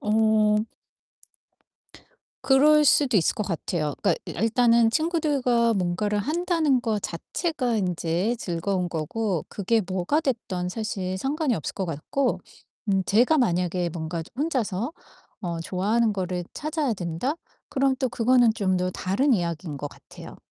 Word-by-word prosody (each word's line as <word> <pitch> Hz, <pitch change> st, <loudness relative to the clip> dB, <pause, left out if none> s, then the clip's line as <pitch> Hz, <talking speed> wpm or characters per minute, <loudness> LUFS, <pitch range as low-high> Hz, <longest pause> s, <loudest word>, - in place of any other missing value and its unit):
어. 215 Hz, 0 st, +3 dB, 1.8 s
그럴 290 Hz, +3 st, +5 dB
수도 275 Hz, -4 st, +4 dB
있을 175 Hz, -, +2 dB
것 215 Hz, -, -2 dB
같아요. 160 Hz, -4 st, -2 dB
그러니까 -, -, +3 dB, 0.3 s
아 -, -, -1 dB
일단은 230 Hz, 0 st, +4 dB
친구들과 280 Hz, -7 st, +1 dB
뭔가를 195 Hz, +3 st, 0 dB
한다는 315 Hz, -, +1 dB
것 220 Hz, -3 st, -1 dB
자체가 250 Hz, -, -2 dB
인제 180 Hz, +3 st, 0 dB
즐거운 180 Hz, 0 st, -2 dB
거고, 175 Hz, +3 st, -2 dB
그게 215 Hz, +3 st, +1 dB
뭐가 190 Hz, -, 0 dB
됐던 220 Hz, -, -2 dB
사실 190 Hz, -2 st, -3 dB
상관이 280 Hz, -, 0 dB
없을 160 Hz, -, -4 dB
것 195 Hz, -, -2 dB
같고 175 Hz, -, -1 dB, 0.5 s
음 195 Hz, -1 st, +2 dB
제가 245 Hz, -, +3 dB
만약에 180 Hz, -, +1 dB
뭔가 165 Hz, +1 st, -4 dB
저 -, -, -16 dB
혼자서 245 Hz, -, -1 dB, 0.5 s
어 170 Hz, -4 st, -3 dB
'좋아하는 210 Hz, +6 st, +1 dB
거를 180 Hz, -2 st, -3 dB
찾아야 305 Hz, -3 st, -1 dB
된다.' 180 Hz, -, -2 dB, 0.3 s
그럼 270 Hz, -1 st, +1 dB
또 260 Hz, -, 0 dB
그거는 240 Hz, 0 st, +3 dB
좀 190 Hz, -4 st, +1 dB
더 180 Hz, 0 st, 0 dB
다른 200 Hz, +11 st, +1 dB
이야기인 170 Hz, -6 st, -2 dB
것 145 Hz, -, -4 dB
같아요. -, -, -13 dB
215 Hz, 285 characters per minute, -25 LUFS, 180-255 Hz, 1.8 s, 그럴